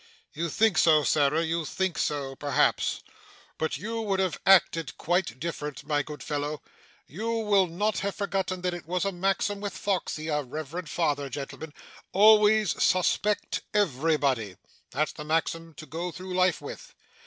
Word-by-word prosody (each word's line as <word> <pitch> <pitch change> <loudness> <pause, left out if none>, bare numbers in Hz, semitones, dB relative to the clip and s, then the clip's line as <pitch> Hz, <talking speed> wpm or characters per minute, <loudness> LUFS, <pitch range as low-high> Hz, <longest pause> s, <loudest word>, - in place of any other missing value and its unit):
'You 170 +1 -2
think 215 +1 +3
so, 155 -2 +5
Sarah, 150 +3 +2
you 165 0 -1
think 190 +3 -2
so 140 -2 -2
perhaps; 145 +1 +1 0.6
but 160 -3 -1
you 225 +7 -4
would 200 -3 -1
have 185 -4 0
acted 165 -5 +4
quite 170 -8 -1
different, 150 -2 -5
my 145 -1 +1
good 150 +1 -8
fellow. 150 0 -3 0.4
You 215 - -5
will 205 -4 +3
not 200 +5 -1
have 200 0 -2
forgotten 190 -2 -2
that 180 0 -1
it 175 -3 -8
was 180 +2 -1
a 195 - 0
maxim 195 +2 -1
with 205 -1 -4
Foxey 180 -5 -2
our 150 -2 0
revered 155 +5 -6
father, 145 -2 0
gentlemen 145 +4 -6 0.4
"Always 210 0 +5
suspect 200 +3 +1
everybody." 140 - +1 0.3
That's 150 +4 -1
the 150 - -8
maxim 165 +1 -1
to 155 - -9
go 170 +3 -4
through 185 +2 -7
life 185 -1 +2
with! - - -9
165 Hz, 155 wpm, -27 LUFS, 150-195 Hz, 0.6 s, so